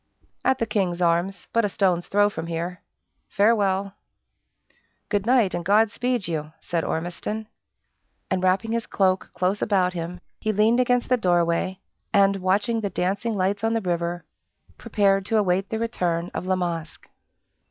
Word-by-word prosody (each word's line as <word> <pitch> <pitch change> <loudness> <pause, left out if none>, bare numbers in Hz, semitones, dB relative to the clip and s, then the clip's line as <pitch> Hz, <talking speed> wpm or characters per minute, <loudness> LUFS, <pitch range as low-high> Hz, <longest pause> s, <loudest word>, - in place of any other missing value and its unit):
"At 265 - +3
the 230 - 0
King's 195 -5 -1
Arms 175 +3 0
but 230 - +3
a 205 - +1
stones 185 -3 +1
throw 205 +1 +3
from 165 -5 -5
here. 170 +2 -4 0.5
Farewell." 200 -2 +2 1.2
"Good 205 0 0
night, 240 -6 +3
and 175 - -2
God 205 +4 +4
speed 245 -3 -1
you!" 155 -2 -4
said 170 -2 -2
Ormiston. 180 +6 -3 0.8
And 185 - +1
wrapping 190 +5 +1
his 230 0 -1
cloak 190 -1 +1
close 185 +3 0
about 185 -4 +2
him, 175 +1 -5 0.2
he 215 - 0
leaned 215 +4 +3
against 245 -1 +2
the 250 - +3
doorway, 175 -1 +1 0.3
and, 200 -1 +4
watching 205 +5 +1
the 200 - -1
dancing 200 +5 -1
lights 200 +2 0
on 225 0 +2
the - - +2
river, 175 -1 -2 0.5
prepared 195 -2 +1
to 225 - +2
await 190 -1 +1
the 220 - -2
return 180 -7 -1
of 180 - -4
La 185 - +2
Masque. 170 -3 -4
195 Hz, 160 wpm, -24 LUFS, 175-215 Hz, 1.2 s, God